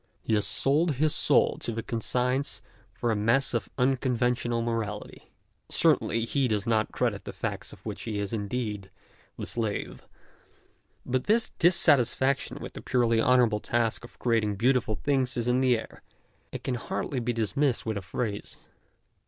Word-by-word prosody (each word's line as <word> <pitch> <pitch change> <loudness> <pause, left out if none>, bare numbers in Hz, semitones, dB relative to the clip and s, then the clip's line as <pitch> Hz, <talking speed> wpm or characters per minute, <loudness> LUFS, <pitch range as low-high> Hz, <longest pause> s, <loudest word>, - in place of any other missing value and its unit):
He - - -1
has 105 -1 +2
sold 150 +3 +3
his 150 +3 +2
soul - - +3
to 115 - -3
his 115 - -3
conscience 125 +4 -1 0.3
for 120 - -2
a - - +1
mess 115 +7 +2
of 120 - -2
unconventional 125 -2 +1
morality. 110 -3 -4 0.4
Certainly 115 0 +3
he 135 +2 +1
does 105 -3 -1
not 110 -2 +1
credit - - -1
the - - -6
facts - - -5
of - - -15
which - - -5
he 110 -3 -4
is 100 0 -3
indeed 105 -2 -3 0.5
the - - -5
slave. 110 -3 -4 1.0
But 130 0 -1
this 225 +2 +2
dissatisfaction 140 -5 +3
with - - -7
the - - -8
purely 115 -2 +2
honourable 120 -4 +3
task 115 +1 0
of 120 - -13
creating 110 -4 +1
beautiful 120 0 +1
things 130 -2 0
is 120 0 -1
in 125 +1 +2
the 125 -2 +3
air, 110 - -10 0.5
and - - -7
can 130 - -2
hardly 125 +2 -3
be 120 0 -1
dismissed 120 +4 0
with 110 -1 -2
a 100 - -3
phrase. 105 +2 -4
120 Hz, 160 wpm, -27 LUFS, 110-130 Hz, 1.0 s, sold